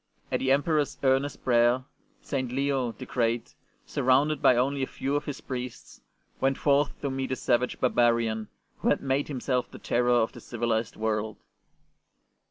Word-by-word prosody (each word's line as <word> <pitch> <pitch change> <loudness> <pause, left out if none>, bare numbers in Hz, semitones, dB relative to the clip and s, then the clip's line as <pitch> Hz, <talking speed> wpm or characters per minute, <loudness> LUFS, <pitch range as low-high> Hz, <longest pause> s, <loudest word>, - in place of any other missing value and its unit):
At - - +1
the 130 - +1
Emperor's 145 +1 +1
earnest 135 +2 +1
prayer 120 +1 +3 0.4
St. 130 -3 -2
Leo 135 -2 0
the - - -9
Great, 115 -1 -1 0.3
surrounded 135 +3 +2
by 125 - +6
only 135 +3 +1
a 130 - 0
few 135 +2 -3
of 145 +1 -1
his 145 - -5
priests, 125 -2 -7 0.4
went 135 0 +1
forth 145 0 +2
to 140 - -1
meet 135 0 -2
the 130 - -1
savage 125 0 0
barbarian 115 -3 +2 0.3
who - - +1
had - - +2
made 135 +1 0
himself 130 -2 -1
the - - -11
terror 120 +1 0
of 120 -2 +3
the - - -12
civilized 115 -1 -2
world. 110 -1 -2
130 Hz, 165 wpm, -27 LUFS, 120-140 Hz, 0.4 s, by